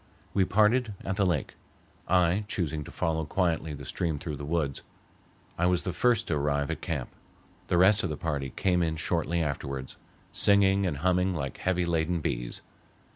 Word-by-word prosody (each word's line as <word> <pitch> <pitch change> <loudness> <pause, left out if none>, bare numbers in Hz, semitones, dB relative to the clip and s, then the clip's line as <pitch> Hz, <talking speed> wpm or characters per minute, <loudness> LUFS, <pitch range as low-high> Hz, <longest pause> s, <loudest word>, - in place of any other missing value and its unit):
We 95 - +3
parted 110 +3 +3
at 95 -1 -2
the 100 -2 +3
lake, 85 -7 -1 0.5
I 90 +3 +3
choosing 80 -6 -2
to - - -10
follow 80 -1 -1
quietly 80 -1 -1
the 70 -1 -9
stream 80 +2 -2
through 75 0 -5
the 70 - -7
woods. 75 -3 -1 0.8
I 90 - +3
was 90 -1 +1
the 90 - -3
first 115 +4 +2
to 80 - +1
arrive 70 +1 0
at 80 - -5
camp. 75 -8 -3 0.6
The 90 - +2
rest 100 +4 +5
of 90 - -2
the 75 - -3
party 70 -4 -2
came 90 +6 +1
in 80 -1 0
shortly 85 +1 0
afterwards, 70 -2 -4 0.3
singing 100 -1 +4
and 75 -5 -2
humming 90 0 +2
like 70 -4 -4
heavy 90 -1 0
laden 85 0 0
bees. - - -3
85 Hz, 180 wpm, -28 LUFS, 75-95 Hz, 0.8 s, rest